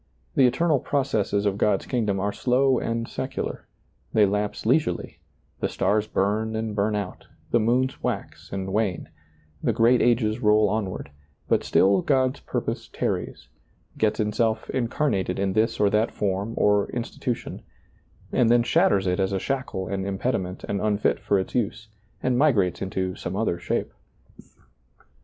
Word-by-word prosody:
The 130 - +5
eternal 150 +3 +2
processes 110 -8 0
of 100 0 0
God's 105 -2 +2
kingdom 105 -6 0
are 100 +1 -1
slow 130 +1 +2
and 115 0 -2
secular; - - -4 0.5
they 105 -2 +5
lapse 105 +1 -2
leisurely, - - 0 0.4
the - - -1
stars 105 +1 +1
bum 110 +3 0
and 110 -1 -3
burn 105 +1 +1
out, 100 -3 -5 0.2
the 120 - +4
moons 125 +4 +1
wax - - -4
and 95 0 -4
wane, 105 -4 -1 0.3
" 75 -2 -32
the - - +2
great 120 +2 +4
ages 115 -2 +2
roll 105 -2 +4
onward," 95 -8 -3 0.4
but - - +2
still 95 0 +4
God's 130 -1 +1
purpose - - -4
tarries, - - -3 0.5
gets 110 -1 +1
itself 110 +1 0
incarnated 120 -7 0
in 95 -1 0
this 110 +2 +1
or 100 -1 +3
that 110 +2 +2
form 100 +3 -2
or 105 -1 +3
insti 120 -1 -5
tution, 125 -3 -3 0.7
and 120 -2 +3
then 120 0 +5
shatters 160 - +3
it 90 0 0
as 95 0 +1
a 95 - 0
shackle 125 -7 -3
and 95 -1 -2
im 100 -1 -2
pediment 95 -6 -2
and 100 - -2
unfit 105 -1 +1
for 100 - +1
its 95 - -3
use, 110 -2 -2 0.3
and 125 -1 +2
migrates 105 - +2
into 95 -1 -2
some 90 0 -5
other 100 -5 0
shape. - - -2
105 Hz, 160 wpm, -25 LUFS, 100-120 Hz, 0.7 s, The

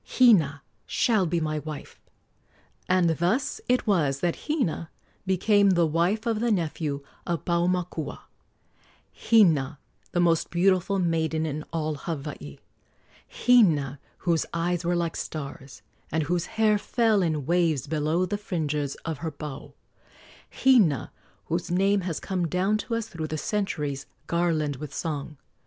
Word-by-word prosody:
Hina 165 - +5 0.2
shall 215 -7 +2
be 170 +1 0
my 155 -1 -1
wife." 150 -1 -8 0.9
And 180 -1 +4
thus 210 +11 0
it 250 0 +2
was 150 - +1
that 175 -1 -2
Hina 245 - -1 0.4
became 200 +2 +4
the 175 -3 +4
wife 175 +8 +1
of 225 -2 0
the 240 +1 +1
nephew 155 -7 -1 0.2
of 170 -4 -2
Paumakua 170 -3 -1 0.9
Hina, 160 - +3 0.3
the 175 - 0
most 170 -2 +2
beautiful 185 +2 +2
maiden 160 -3 0
in 155 0 -3
all 155 -2 -1
Hawaii; 140 - -6 0.7
Hina, 160 - +3 0.2
whose 170 -3 +1
eyes 175 +1 0
were 175 +1 +1
like 170 -1 -1
stars, 140 -2 -7 0.3
and 160 +2 +1
whose 175 +3 -1
hair 215 -1 +4
fell 225 -2 +2
in 155 -5 -1
waves 165 -5 +1
below 155 +4 0
the 205 +3 -3
fringes 150 -7 -2
of 160 -3 -3
her 165 - -3
pau; 150 -2 -8 0.8
Hina, 210 - +3 0.3
whose 170 +2 -2
name 195 +3 +2
has 175 -4 -3
come 180 -3 -2
down 190 +5 +1
to 230 +1 -3
us 230 -1 -2
through 160 -6 -5
the 155 - -3
centuries 150 -8 -2 0.2
garlanded 160 -4 0
with 150 - -7
song. 150 -2 -4
170 Hz, 140 wpm, -26 LUFS, 155-190 Hz, 0.9 s, Hina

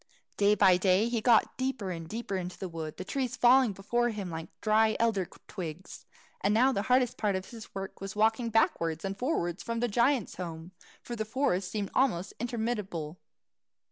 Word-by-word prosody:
Day 205 +1 +4
by 190 -3 +5
day 190 +4 +3
he 235 -2 -1
got 235 0 +4
deeper 260 -7 -2
and 165 -2 -6
deeper 225 -3 -4
into 180 -1 -4
the 190 - -4
wood, 160 -3 -6
the 185 - -6
trees 255 -1 -2
falling 250 -1 +5
before 240 +5 0
him 205 -5 -5
like 160 0 -5
dry 220 0 +3
elder 215 -6 +1 0.2
twigs; 180 -2 -7 0.4
and 205 +2 +3
now 255 +4 +5
the 200 - 0
hardest 250 +2 +2
part 205 -3 0
of 190 0 -5
his 225 -4 -11
work 195 0 -6
was 195 0 -6
walking 225 +2 +2
backwards 165 -7 +1
and 195 0 -2
fowards 195 - -1
to 230 - -3
the 245 - +1
giant's 235 +1 +1
home, 170 -1 -6 0.3
for 240 - -5
the 220 - -2
forest 215 -6 0
seemed 205 -3 -3
almost 205 -9 +1
interminable. 210 -9 -3
210 Hz, 185 wpm, -30 LUFS, 185-235 Hz, 0.4 s, by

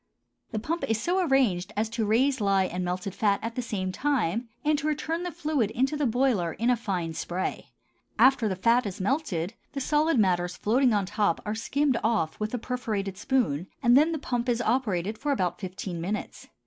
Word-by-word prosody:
The - - -4
pump 325 +10 -2
is 225 -1 +1
so 365 +8 +1
arranged 220 - +2
as 215 +1 +1
to 225 -2 -2
raise 260 +4 +2
lye 195 -1 +3
and 180 0 -3
melted 180 +2 -3
fat 200 -1 +2
at 230 +1 -3
the 250 - -2
same 195 -5 -3
time 235 - 0 0.2
and 305 0 +4
to 295 - -2
return 315 +2 -1
the 355 0 -3
fluid 305 - 0
into 265 +6 0
the 295 -2 +1
boiler 230 -9 +1
in 235 +2 +1
a - - +4
fine 185 -8 -3
spray. 175 +3 -3 0.5
After 260 -4 +5
the 190 - -1
fat 230 +5 +3
is 190 - -6
melted, 200 - -1 0.2
the 275 - -3
solid 300 +2 +2
matters 180 -3 +1
floating 250 +4 +3
on 205 -3 +1
top 200 -2 0
are 210 - -1
skimmed 265 +3 0
off 215 -8 0
with 215 0 -2
a - - 0
perforated 220 -6 -3
spoon, 195 - 0 0.2
and 240 +1 +6
then 305 +4 +5
the 325 - -1
pump 245 -4 -2
is 240 -1 +1
operated 215 -5 0
for 290 - -1
about 185 -10 0
fifteen 185 -2 -5
minutes. 205 +5 -4
225 Hz, 200 wpm, -27 LUFS, 190-265 Hz, 0.5 s, and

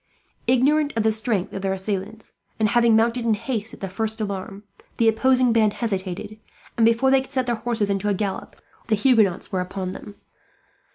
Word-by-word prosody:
Ignorant 285 +4 +3
of 225 - +2
the 220 - +3
strength 215 -3 -1
of 195 - -5
their 190 0 -1
assailants, 200 +3 -5 0.3
and 215 -1 +3
having 235 -1 +4
mounted 230 +2 +2
in 225 -2 +2
haste 225 -1 -4
at - - -20
the 195 - -3
first 220 +4 -3
alarm, 200 -1 -5 0.3
the 230 - +3
opposing 255 +2 +3
band 215 -2 +3
hesitated; 200 -1 -4 0.4
and 225 -1 +4
before 230 +3 +3
they 270 0 +5
could 265 - -12
set 260 -2 0
their 240 - 0
horses 225 -3 -1
into 200 +1 -1
a 200 - +1
gallop, 195 0 -4 0.3
the 220 - +2
Huguenots 210 -5 +2
were 185 - 0
upon 185 0 -5
them. 205 - -10
220 Hz, 190 wpm, -23 LUFS, 200-235 Hz, 0.4 s, they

